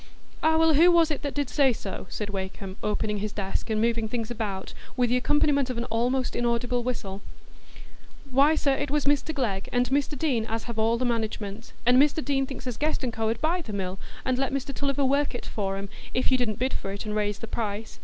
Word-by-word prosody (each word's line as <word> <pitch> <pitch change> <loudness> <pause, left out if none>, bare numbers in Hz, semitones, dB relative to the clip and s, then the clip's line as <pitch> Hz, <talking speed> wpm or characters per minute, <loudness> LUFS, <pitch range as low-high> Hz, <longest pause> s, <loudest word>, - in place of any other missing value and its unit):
"Ah, 320 0 +4
well, 325 0 +5
who 330 +5 +7
was 335 -2 +5
it 295 - -2
that 285 - -4
did 285 -2 0
say 275 0 +4
so?" 195 -4 -6
said 205 -1 -4
Wakem, 190 0 -5
opening 210 0 -1
his 210 +1 -3
desk, 200 +2 -3
and 215 -1 +1
moving 230 0 +1
things 230 0 -3
about, 205 -5 -4 0.2
with 245 -1 +2
the 250 - +4
accompaniment 285 0 +2
of 250 - -3
an 235 - -1
almost 245 +3 +1
inaudible 240 +1 +1
whistle. 210 -5 -4 1.1
"Why, 280 +4 +5
sir, 280 -3 +2
it 285 +1 -2
was 295 0 +1
Mr 290 +2 +2
Glegg 220 -10 -2
and 245 0 +2
Mr 285 +1 +1
Deane, 250 -7 0
as 225 0 -2
have 235 -2 -5
all 225 +1 +3
the 250 - 0
management; 220 -2 -3
and 250 +2 +7
Mr 295 +1 +2
Deane 270 -1 +1
thinks 270 -1 -7
as 250 -3 -3
Guest 300 -2 0
&Co. 220 0 0
'ud 225 - -1
buy 340 +3 +1
the 225 -10 -7
mill 190 -1 -3 0.3
and 255 -1 +1
let 270 -1 0
Mr 275 +1 -2
Tulliver 280 0 0
work 280 0 +2
it - - -5
for 195 -2 -2
'em, 200 +1 -5 0.3
if 255 +2 +1
you 260 - +5
didn't 215 -4 0
bid 260 +2 0
for 195 - -3
it 200 +2 -5
and 210 0 -3
raise 210 -1 0
the - - -6
price. 220 -1 -4
245 Hz, 230 wpm, -27 LUFS, 215-275 Hz, 1.1 s, who